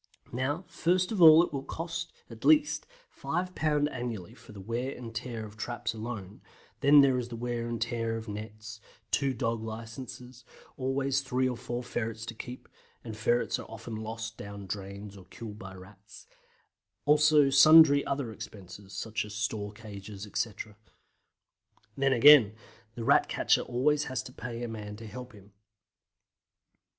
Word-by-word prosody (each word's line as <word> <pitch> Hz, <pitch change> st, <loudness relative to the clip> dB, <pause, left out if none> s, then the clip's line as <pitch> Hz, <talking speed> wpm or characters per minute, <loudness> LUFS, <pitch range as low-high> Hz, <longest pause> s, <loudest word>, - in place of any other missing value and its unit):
Now, 145 Hz, +8 st, -2 dB
first 180 Hz, +3 st, +1 dB
of 205 Hz, -5 st, -1 dB
all 160 Hz, 0 st, +10 dB
it 175 Hz, -, -4 dB
will 140 Hz, -, -2 dB
cost, 165 Hz, +4 st, -5 dB, 0.2 s
at 115 Hz, -1 st, -12 dB
the -, -, -1 dB
least, 300 Hz, -1 st, +4 dB, 0.2 s
5 180 Hz, +1 st, -3 dB
pounds 150 Hz, -3 st, +1 dB
annually 120 Hz, -8 st, -5 dB
for -, -, -15 dB
the 105 Hz, -, -10 dB
wear 120 Hz, +7 st, -3 dB
and 115 Hz, -2 st, -8 dB
tear 115 Hz, 0 st, -5 dB
of 105 Hz, 0 st, -13 dB
traps 120 Hz, 0 st, -3 dB
alone, 110 Hz, -3 st, -7 dB, 0.4 s
then 145 Hz, +1 st, +7 dB
there 135 Hz, -2 st, +3 dB
is 120 Hz, -, -4 dB
the 120 Hz, -, -7 dB
wear 120 Hz, 0 st, -3 dB
and 120 Hz, -1 st, -3 dB
tear 115 Hz, 0 st, -1 dB
of 115 Hz, 0 st, -8 dB
nets; 110 Hz, +1 st, -8 dB, 0.3 s
two 140 Hz, -2 st, +2 dB
dog 115 Hz, -1 st, -1 dB
licences; 115 Hz, +2 st, -8 dB, 0.3 s
always 135 Hz, +1 st, 0 dB
three 130 Hz, -1 st, 0 dB
or 125 Hz, -, -2 dB
four 120 Hz, +1 st, -5 dB
ferrets 115 Hz, -2 st, -4 dB
to 115 Hz, -, -6 dB
keep 125 Hz, +2 st, -9 dB, 0.4 s
(and 110 Hz, -2 st, -7 dB
ferrets 120 Hz, +2 st, +1 dB
are -, -, -9 dB
often 115 Hz, +1 st, -8 dB
lost 110 Hz, +1 st, -6 dB
down 100 Hz, 0 st, -8 dB
drains 100 Hz, +1 st, -7 dB
or 95 Hz, -2 st, -13 dB
killed 105 Hz, +1 st, -9 dB
by 95 Hz, 0 st, -9 dB
Rats); 100 Hz, +3 st, -14 dB, 0.8 s
also 150 Hz, -1 st, +5 dB
sundry 145 Hz, +1 st, +8 dB
other 140 Hz, -4 st, -2 dB
expenses, 100 Hz, -2 st, -10 dB
such 110 Hz, +3 st, -3 dB
as 105 Hz, 0 st, -9 dB
store 105 Hz, -1 st, -2 dB
cages, 105 Hz, -2 st, -9 dB
etc. 105 Hz, 0 st, -4 dB, 1.2 s
Then, 135 Hz, 0 st, +2 dB
again, 125 Hz, -4 st, +8 dB, 0.4 s
the 115 Hz, -, -5 dB
Rat -, -, +4 dB
catcher -, -, +2 dB
always 145 Hz, +5 st, +1 dB
has 130 Hz, -, -3 dB
to 125 Hz, -, -11 dB
pay 120 Hz, 0 st, -6 dB
a -, -, -2 dB
man 105 Hz, -2 st, -7 dB
to 115 Hz, +2 st, -10 dB
help 125 Hz, +3 st, -9 dB
him. 100 Hz, -1 st, -17 dB
115 Hz, 165 wpm, -29 LUFS, 110-135 Hz, 1.2 s, all